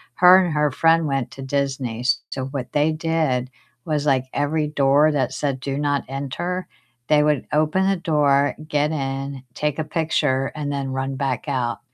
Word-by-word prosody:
her 185 +1 +7
and 175 - -1
her 150 -1 +2
friend 165 +3 +3
went 135 -4 -1
to 135 - -9
Disney, 135 -4 -2
s 125 +2 +1
so 130 -1 -3
what 135 -2 -5
they 150 +2 +2
did 155 -6 -1 0.3
was, 150 -2 -1
like, 130 -2 +2
every 150 +2 0
door 145 +1 +3
that 130 -4 0
said, 135 -2 -2
"Do 135 +1 -3
not 145 -1 0
enter," 155 +7 -4 0.4
they 150 -1 +4
would 150 -2 +1
open 155 +6 +2
the 195 - +2
door, 145 -5 +2
get 150 -1 +1
in, 135 -2 -4
take 150 +2 -2
a 155 - -1
picture, 145 -4 0
and 145 -2 -3
then 140 -1 -3
run 135 +1 -3
back 130 -1 -2
out. 125 -4 -1
145 Hz, 180 wpm, -22 LUFS, 135-155 Hz, 0.4 s, her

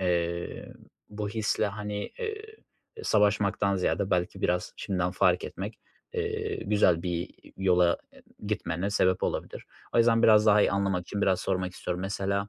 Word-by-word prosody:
eee, 85 -1 -2 0.4
bu 105 0 -4
hisle, 110 0 0
hani, 105 0 -5 0.2
eee, 435 -2 -4 0.5
e, 440 - -9
savaşmaktan 100 -1 +2
ziyade, 95 +2 0
belki 90 -1 0
biraz 90 0 0
şimdiden 90 -3 -1
fark 90 -1 +2
etmek, 100 +4 -6 0.4
eee, 435 -1 -2
güzel 90 -5 +3
bir 85 -1 -2 0.3
yola 90 -2 +3 0.2
e - - -18 0.2
gitmene 95 -2 -2
sebep 95 -2 +2
olabilir. - - -3 0.3
O - - +4
yüzden, 115 0 +4
biraz 105 -1 +6
daha 105 0 +6
iyi - - +3
anlamak 100 -2 0
için 100 +3 -4
biraz 95 -2 +2
sormak 95 0 -1
istiyorum. 90 0 -4
Mesela 100 +1 -2
100 Hz, 155 wpm, -28 LUFS, 90-105 Hz, 0.5 s, biraz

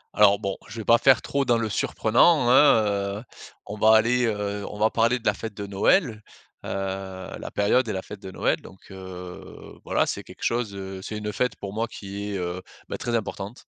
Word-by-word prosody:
Alors 100 -1 +6
bon, 100 -2 -3
je 115 -1 -10
vais 110 - -6
pas 115 0 +5
faire 135 -2 +5
trop 140 0 0
dans 120 -3 +2
le 115 -1 -1
surprenant, 120 - +3
hein, 105 -8 +4
heu. - - -14 0.4
On 105 +1 -7
va 110 +1 +6
aller, 125 +3 +3
heu, 105 -1 -2
on 105 - -8
va 110 +1 +2
parler 115 +2 +2
de 120 - -15
la - - +3
fête 110 -2 -7
de 100 - -5
Noël. 105 - +2 0.4
Heu, - - -6 0.7
la - - -6
période 115 +4 +2
et - - -2
la 95 -1 -4
fête 105 -1 -9
de 95 - -8
Noël. 95 - 0
Donc 95 +1 -15
heu, 90 -1 -10
voilà, - - +1
c'est - - -3
quelque - - -13
chose 115 -4 -1
heu, 95 -1 -7
c'est 105 +1 -5
une 105 0 -4
fête 125 +5 0
pour 100 0 -7
moi 115 +2 -1
qui 100 -1 -7
est, - - -1
heu, 90 0 -3 0.3
bah, - - -3
très 120 0 -2
importante 105 0 -4
105 Hz, 220 wpm, -25 LUFS, 100-115 Hz, 0.7 s, Alors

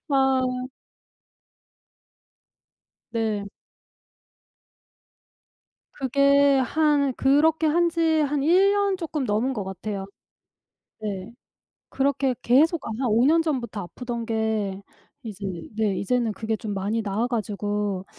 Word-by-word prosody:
아. 265 -2 +3 2.7
네. 220 -3 -1 2.5
그게 280 +1 +3
한 285 0 +2
그렇게 305 +5 +3
한 340 +3 +3
지 335 0 -3 0.2
한 290 0 0
1 365 +6 +4
년 405 -1 +1
쪼끔 315 -6 -3
넘은 225 +5 0
거 210 -6 -4
같아요. 195 +1 -5 0.9
네. 200 -1 -5 0.6
그렇게 270 -1 0
계속 305 +6 +4
한 225 - -4
5 230 +3 +3
년 325 +3 +4
전부터 240 -10 -3
아프던 235 +5 -6
게 220 -3 -1 0.4
이제 210 -4 -8 0.3
네 215 -3 +1
이제는 235 +2 0
그게 220 +1 -3
좀 210 -1 -5
많이 205 +4 -1
나아 210 +3 -1
가지고. 205 -4 -2
245 Hz, 170 characters per minute, -24 LUFS, 210-285 Hz, 2.7 s, 1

